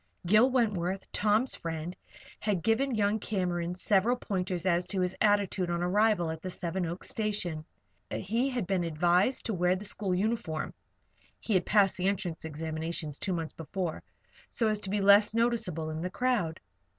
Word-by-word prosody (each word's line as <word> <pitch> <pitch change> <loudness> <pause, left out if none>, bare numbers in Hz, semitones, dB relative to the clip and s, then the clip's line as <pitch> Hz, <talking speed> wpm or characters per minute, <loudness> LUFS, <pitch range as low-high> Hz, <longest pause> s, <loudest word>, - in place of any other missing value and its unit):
Gil 215 +8 +5
Wentworth, 195 -7 0
Tom's 215 +5 +2
friend, 165 +1 -5 0.4
had 200 -6 -1
given 250 +3 +2
young 210 0 +2
Cameron 180 -4 -2
several 205 +6 +2
pointers 185 -6 -3
as 175 -1 +2
to 190 0 -2
his 180 0 0
attitude 200 -3 +2
on 170 0 -1
arrival 190 -2 +2
at 160 0 -6
the 185 - -4
Seven 175 0 -3
Oaks 170 +3 -6
station. 200 -8 -2 0.5
He 230 +8 -1
had 245 -6 -2
been 185 -1 0
advised 175 - +2
to 225 - -1
wear 180 0 +2
the 195 +3 -5
school 195 -2 -2
uniform 200 -5 -1 0.7
(he 220 - -2
had 185 -2 +2
passed 200 -3 +4
the 185 +1 0
entrance 185 -5 -2
examinations 160 -1 -4
two 195 - -2
months 165 -2 -3
before) 170 +1 -4 0.5
so 230 - +1
as 215 -1 0
to 200 - -6
be 205 +1 0
less 205 +2 +6
noticeable 220 -10 0
in 155 +1 -4
the 180 - -2
crowd. 210 -7 0
190 Hz, 170 wpm, -30 LUFS, 170-210 Hz, 0.7 s, less